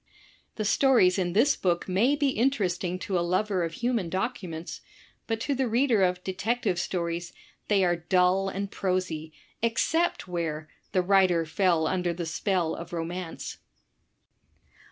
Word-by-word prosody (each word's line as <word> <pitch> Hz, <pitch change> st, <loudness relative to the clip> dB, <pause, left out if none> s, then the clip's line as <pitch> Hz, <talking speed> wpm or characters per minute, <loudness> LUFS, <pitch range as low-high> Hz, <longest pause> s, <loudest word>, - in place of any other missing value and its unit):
'* -, -, -33 dB
The 215 Hz, -, -3 dB
stories 215 Hz, -6 st, +4 dB
in 175 Hz, -2 st, -1 dB
this 255 Hz, +9 st, +4 dB
book 175 Hz, -2 st, 0 dB
may 215 Hz, +10 st, +3 dB
be 290 Hz, -1 st, +1 dB
interesting 195 Hz, -8 st, 0 dB
to 185 Hz, 0 st, -1 dB
a -, -, +1 dB
lover 185 Hz, +2 st, 0 dB
of 165 Hz, -1 st, -3 dB
human 235 Hz, -4 st, -1 dB
documents, 185 Hz, -4 st, -4 dB, 0.5 s
but 225 Hz, -1 st, -1 dB
to 285 Hz, -, 0 dB
the 265 Hz, -1 st, 0 dB
reader 235 Hz, -2 st, +2 dB
of 180 Hz, -1 st, +1 dB
"Detective 195 Hz, +1 st, -1 dB
Stories, 170 Hz, -1 st, -3 dB, 0.3 s
they 200 Hz, -2 st, +3 dB
are 175 Hz, -1 st, +2 dB
dull 180 Hz, +3 st, +2 dB
and 195 Hz, +1 st, -4 dB
prosy, 180 Hz, -5 st, -2 dB, 0.3 s
eoccept 325 Hz, +9 st, +1 dB
where 160 Hz, -3 st, -3 dB
" -, -, -39 dB
the 185 Hz, -, +2 dB
writer 185 Hz, -3 st, +3 dB
fell 170 Hz, 0 st, +2 dB
imder 175 Hz, 0 st, -1 dB
the 175 Hz, -, -3 dB
spell 170 Hz, 0 st, 0 dB
of 170 Hz, -, -7 dB
romance. 170 Hz, +1 st, -5 dB
185 Hz, 155 wpm, -27 LUFS, 175-215 Hz, 0.5 s, stories